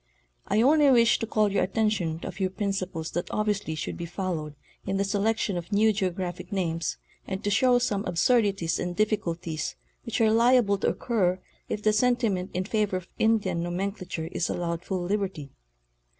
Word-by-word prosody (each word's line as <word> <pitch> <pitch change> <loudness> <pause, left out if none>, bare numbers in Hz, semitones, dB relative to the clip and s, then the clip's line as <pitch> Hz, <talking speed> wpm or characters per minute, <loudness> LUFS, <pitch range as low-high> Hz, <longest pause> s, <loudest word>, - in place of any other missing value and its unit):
I 220 - +3
only 295 +2 +5
wish 235 -3 +5
to 225 - -3
call 215 -2 +2
your 200 - +1
at 190 - -2
tention 210 -8 +1
to - - -5
a - - -4
few 190 0 -1
principles 185 -5 -3
that 175 - -3
obviously 205 -6 -1
should 155 - -4
be 170 - -5
followed 165 -5 -4 0.3
in 195 0 -2
the 200 - +2
selection 205 0 0
of 175 +3 -6
new 215 +2 +4
geographic 185 -1 -3
names 170 -4 -1 0.3
and 190 0 -4
to 205 - 0
show 250 +4 +4
some 205 -5 0
absur 230 +8 +3
dities 190 -5 -1
and 175 0 -3
difficulties 170 - -1 0.3
which - - -3
are 220 -1 +4
liable 230 -3 +4
to - - 0
occur 190 -6 0 0.3
if 210 - -3
the 215 - +3
sentiment 220 -5 +1
in 185 - 0
favor 210 -3 0
of 185 0 -9
Indian 205 -6 +2
nomenclature 180 -1 -3
is 175 - -1
allowed 170 -1 -2
full 185 -1 -2
liberty. 185 -7 -2
195 Hz, 180 wpm, -27 LUFS, 175-215 Hz, 0.3 s, only